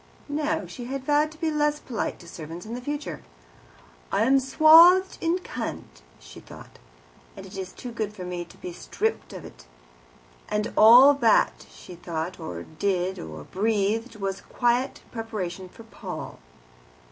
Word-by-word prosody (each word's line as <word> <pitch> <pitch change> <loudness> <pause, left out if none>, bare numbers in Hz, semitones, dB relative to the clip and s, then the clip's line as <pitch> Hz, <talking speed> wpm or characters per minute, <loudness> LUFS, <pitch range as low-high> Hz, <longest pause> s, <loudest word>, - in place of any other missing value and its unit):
No; 305 +2 -1
she 245 - -8
had 265 +1 -5
vowed 295 +2 +2
to 315 - -15
be 320 0 -1
less 295 0 +1
polite 235 -7 -4
to 170 - -14
servants 165 +2 -9
in 225 - -7
the 245 - -5
future. 290 +3 -5 0.9
"I 210 - +2
am 270 +3 +4
swathed 330 +7 +6
in 335 +2 +1
cant," 250 - -7 0.2
she - - -13
thought, - - -14 0.6
"and 195 - -9
it 190 - -12
is 190 -1 -6 0.2
good 215 -2 -3
for 195 -3 -9
me 180 -1 -4
to - - -18
be 180 - -7
stripped - - -3
of - - -9
it." - - -14 0.8
And 210 +1 -2
all 245 +6 +9
that 240 -6 +2
she - - -13
thought 170 0 -5
or 85 -1 -6
did 185 - -2
or 80 -1 -8
breathed 220 - -1
was 195 -1 -3
a - - -19
quiet 245 +2 0
preparation 195 -6 -5
for 230 - -14
Paul. 225 - -8
225 Hz, 160 wpm, -25 LUFS, 185-285 Hz, 0.9 s, all